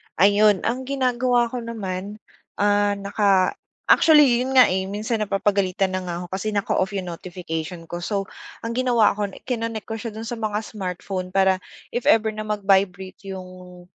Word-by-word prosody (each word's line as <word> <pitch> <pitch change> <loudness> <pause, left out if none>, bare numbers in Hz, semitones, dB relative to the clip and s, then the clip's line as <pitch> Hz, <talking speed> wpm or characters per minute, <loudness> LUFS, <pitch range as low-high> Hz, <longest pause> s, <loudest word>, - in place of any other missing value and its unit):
Ayun. 205 +1 +4
Ang 255 +3 -2
ginagawa 250 -3 +1
ko 250 - -3
naman, 205 -4 -5 0.4
ah, 205 0 +2
naka 200 -2 +2 0.4
actually, 295 -7 +6
yun 265 - -3
nga 255 - +8
eh. 190 +1 0
Minsan 215 +3 -2
napapagalitan 195 -2 0
na 185 - -3
nga 175 - -3
ako - - -8
kasi 195 +3 -2
naka-off 200 0 0
yung 185 -2 -3
notification 170 -1 -6
ko. 175 - -5
So, 200 0 -1 0.4
ang 230 - -3
ginawa 240 -4 +3
ko, 205 0 -1 0.2
kinonek 230 -3 -3
ko 225 - -4
siya 230 0 -5
dun 225 +1 -6
sa 240 - -3
mga 210 -1 -1
smartphone 185 -2 -5
para 190 -1 +4 0.4
if 240 - -2
ever 220 -1 +4
na 215 - -4
mag-vibrate 195 -2 +1 0.2
yung, 185 -1 -11
205 Hz, 165 wpm, -23 LUFS, 185-230 Hz, 0.4 s, nga